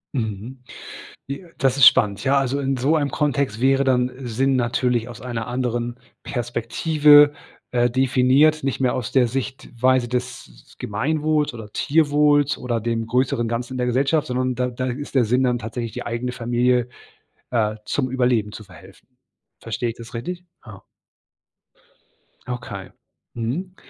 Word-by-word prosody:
Mhm. 115 +2 -4 0.6
J 165 +6 -7
das 135 -1 +2
ist 140 - +7
spannend, 100 -5 +5
ja. 140 +1 +3
Also, 135 +1 -1
in 135 0 0
so 135 +6 +1
einem 145 -3 0
Kontext 140 -6 -1
wäre 135 +1 +3
dann 125 -1 +2
Sinn 130 +3 +1
natürlich 120 -1 0
aus 120 -3 -10
einer 120 -2 -4
anderen 120 -1 -2 0.2
Perspektive, 145 +5 +4 0.4
äh, 120 0 +2
definiert. 135 +4 +3
Nicht 135 -1 -2
mehr 125 - +2
aus 125 -4 -4
der 130 -3 +3
Sichtweise 130 0 -1
des 125 - -6
Gemeinwohls 150 +6 0
oder 110 -3 -9
Tierwohls 145 -1 +2
oder 120 -2 -2
dem 115 0 -2
größeren 120 -1 0
Ganzen 120 +2 -3
in - - -4
der 125 - 0
Gesellschaft, 135 +5 +1
sondern 130 0 -1
da 125 +1 0
da 130 +1 -4
ist 140 +4 -5
der 130 -4 +3
Sinn 125 +4 +2
dann 125 -1 +1
tatsächlich, 115 +1 -5
die - - -7
eigene 120 +1 -3
Familie, 125 0 0 0.6
äh, 110 -3 0
zum 130 - -1
Überleben 125 -5 +1
zu 110 - -9
verhelfen. 95 +2 -17 0.5
Verstehe 115 +2 -3
ich 115 - -10
das 115 -1 -11
richtig? 175 +10 -5 0.2
Ja. 105 -5 -11 1.7
Okay. 120 -6 -6 0.4
Mhm. 150 +12 -4
125 Hz, 150 wpm, -22 LUFS, 115-135 Hz, 1.7 s, ist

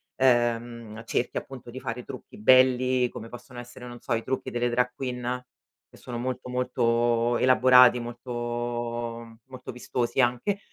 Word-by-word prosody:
ehm, 120 -3 +1
cerchi 120 +1 -2
appunto 130 -3 -6
di 130 +2 -8
fare 120 +1 -5
trucchi - - -10
belli, 130 +1 +4
come 115 - -8
possono 120 +1 -10
essere, 120 +1 -10
non 120 0 -9
so, 120 - -3
i 115 0 -1
trucchi 130 0 -3
delle 120 0 0
drag 125 +1 +1
queen, 125 -1 -4 0.4
che - - -18
sono 120 - -7
molto, 125 +1 -4
molto 120 -1 +1
elaborati, 125 -1 +6
molto 120 -1 -4
molto 130 -1 -9
vistosi 125 +1 -1
anche. 125 +12 0
120 Hz, 145 wpm, -26 LUFS, 120-125 Hz, 0.4 s, elaborati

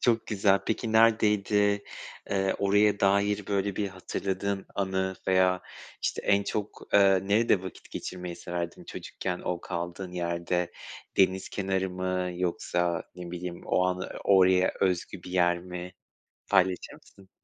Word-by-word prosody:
Çok 115 -2 +2
güzel. 100 -2 +3
Peki 110 0 -1
neredeydi? 105 -2 +3 0.5
Iıı, 95 -1 +1
oraya 100 +1 +3
dair 100 +1 +2
böyle 100 -1 -1
bir 100 -2 0
hatırladığın 95 +1 -3
anı 95 -1 -1
veya, 95 -1 +3 0.4
işte, - - -1
en 100 0 +4
çok, 105 +1 -5
ııı, 95 -1 +5
nerede 105 -2 +3
vakit 95 - -9
geçirmeyi 90 -1 -6
severdin 85 -1 -5
çocukken 90 -2 -5
o 90 -1 -2
kaldığın 85 +1 -5
yerde? 85 0 -1 0.4
Deniz 95 -1 +3
kenarı 95 -1 -1
mı 90 0 -2
yoksa, 90 -1 -1
ne 90 -1 -8
bileyim, 90 0 -5
o 90 - +2
anı, 90 0 -1 0.2
oraya 95 -1 +5
özgü 90 -1 0
bir 90 - -9
yer 90 -1 +3
mi? 90 0 -7 0.6
Paylaşır 95 -2 +2
mısın? 95 -1 -18
95 Hz, 135 wpm, -28 LUFS, 90-100 Hz, 0.6 s, ııı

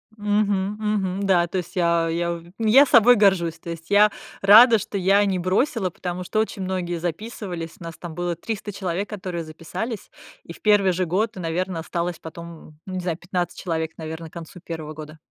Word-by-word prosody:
Мгм 205 -1 0
мгм. 200 -3 -1
Да, 175 -3 +3
то 180 - -3
есть 180 - -5
я 170 -2 +2
я 170 +1 -1 0.2
я 230 +6 +6
собой 245 -2 +6
горжусь. 190 -6 +3
То 170 - -9
есть 165 0 -9
я 205 +1 +6 0.3
рада, 225 +4 +8
что 205 0 -4
я 195 +2 +4
не 190 -2 0
бросила, 190 +3 +1
потому 180 +1 -5
что 215 +4 -1
очень 220 -2 -2
многие 180 -2 -2
записывались, 175 -1 -5
нас 165 -2 -8
там 175 -2 -8
было 175 +1 -2
300 205 +4 -5
человек, 190 0 -3
которые 185 -5 -5
записались. 165 +8 -6 0.3
И - - -9
в - - -17
первый 205 -3 +4
же 180 +1 0
год, 200 +6 0
наверно, 180 0 -2
осталось 170 +1 -3
потом, 165 -1 -11
ну, 190 - -7
не 185 - -2
знаю, 175 -3 -2
15 175 -1 -3
человек, 160 -3 -2
наверно, 160 0 -7
к - - -33
концу 170 +1 -9
первого 160 -3 -7
года. 155 0 -10
180 Hz, 190 wpm, -23 LUFS, 170-205 Hz, 0.3 s, рада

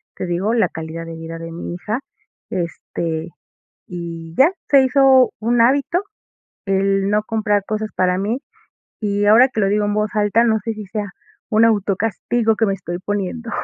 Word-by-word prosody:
te - - -4
digo, 180 +6 0
la 235 -2 +2
calidad 160 +1 -6
de 165 0 -7
vida 165 0 -7
de 165 0 -7
mi 170 +1 -6
hija. 210 +7 -3 0.5
Este, 165 -1 -3 0.6
y 165 -2 -7
ya, 275 +6 +6 0.2
se 275 -2 +7
hizo 265 -1 +5
un 235 +2 +1
hábito 280 +8 +2 0.6
el 195 0 +1
no 210 0 +2
comprar 210 -2 0
cosas 215 0 -3
para 180 -1 +2
mí, 215 +7 -1 0.6
y 205 -1 0
ahora 235 +5 +7
que 220 -4 -3
lo 195 - +2
digo 210 +1 +1
en 205 - -1
voz 210 0 0
alta, 210 +2 +3
no 220 -2 +2
sé 225 +3 -3
si 210 -1 -7
sea, 210 +1 -3 0.4
un 220 0 +4
auto 205 -3 +2
castigo 225 +1 0
que 225 - +2
me 195 - +1
estoy 175 -2 -6
poniendo. 205 +4 -3
210 Hz, 180 wpm, -20 LUFS, 180-225 Hz, 0.6 s, se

